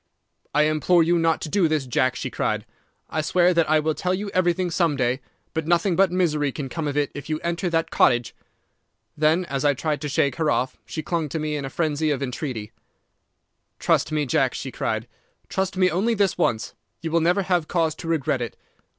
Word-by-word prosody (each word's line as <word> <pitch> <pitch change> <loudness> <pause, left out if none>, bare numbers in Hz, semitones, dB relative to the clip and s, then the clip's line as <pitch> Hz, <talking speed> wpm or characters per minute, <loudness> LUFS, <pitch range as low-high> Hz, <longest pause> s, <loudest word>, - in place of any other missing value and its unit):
"'I 150 - +5
implore 155 +3 +3
you 170 +1 +2
not 165 -1 +2
to - - -3
do 190 0 +3
this, 155 -3 0
Jack,' 130 +1 +1
she - - -4
cried. - - -1 0.5
'I 155 - 0
swear 175 +3 +3
that 165 -2 +2
I 155 0 +5
will 155 +1 0
tell 180 +4 -1
you 200 +1 -4
everything 180 0 +1
some 165 -3 +2
day, 130 0 0 0.3
but 160 -1 -2
nothing 175 +2 +2
but 190 0 +4
misery 155 -6 +1
can 135 -1 -5
come 160 +2 -3
of 145 0 -2
it 145 -1 +1
if 145 +2 -8
you 155 0 -1
enter 170 +1 -1
that 165 -1 0
cottage.' 120 -1 +3 0.8
Then, 160 +4 +2
as 135 -3 -3
I 145 -1 +3
tried 150 +1 -2
to 150 - -3
shake 140 -1 +1
her 160 -2 +1
off, 130 -2 0
she 155 - -5
clung 165 -1 -1
to 150 - -3
me 155 -1 -2
in 140 -2 -3
a - - -4
frenzy 155 +1 0
of 140 -2 0
entreaty. 125 -4 -4 1.1
"'Trust - - +1
me, 150 -1 0
Jack!' 130 0 +1
she 135 - -5
cried. 110 0 -2 0.4
'Trust 190 0 -2
me 185 -1 +4
only 210 +8 +1
this 200 -3 +2
once. 115 -10 0 0.3
You 165 - -3
will 165 0 +3
never 180 +4 +2
have 180 -4 +1
cause 165 -3 +1
to 165 - -9
regret 145 -5 0
it. 120 - -5
155 Hz, 215 wpm, -24 LUFS, 145-175 Hz, 1.1 s, I